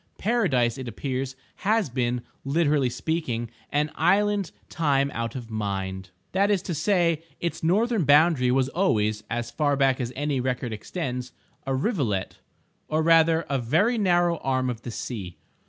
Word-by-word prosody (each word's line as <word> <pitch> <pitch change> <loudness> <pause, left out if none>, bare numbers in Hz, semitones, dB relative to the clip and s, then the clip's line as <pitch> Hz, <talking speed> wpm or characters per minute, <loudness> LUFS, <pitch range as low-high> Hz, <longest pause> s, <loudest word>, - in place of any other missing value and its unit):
Paradise, 150 - +1
it 130 - -6
appears, 130 +3 -3 0.2
has 215 0 +1
been, 125 -1 -1 0.2
literally 145 -2 +2
speaking, 120 -2 -2 0.2
an 150 +1 +1
island 200 +3 +2 0.2
time 140 -3 +1
out 115 +1 -3
of 120 -3 -7
mind—that 95 - -2
is 200 -3 +1
to 180 - -3
say, 170 -1 +2 0.2
its 170 - -3
northern 210 +5 +2
boundary 145 -2 +5
was 130 +1 +2
always 110 - +1
(as 120 0 -3
far 145 +2 +1
back 135 -1 +2
as 120 -1 -3
any 145 -1 -1
record 125 -2 -2
extends) 125 - -4 0.3
a 135 - +1
rivulet, 130 - -1 0.5
or 155 +1 0
rather 165 0 +4
a 140 -2 0
very 190 - +2
narrow 175 -3 +3
arm 130 -3 0
of 115 -2 -7
the 120 - -7
sea. 105 -6 -6
135 Hz, 150 wpm, -25 LUFS, 120-170 Hz, 0.5 s, boundary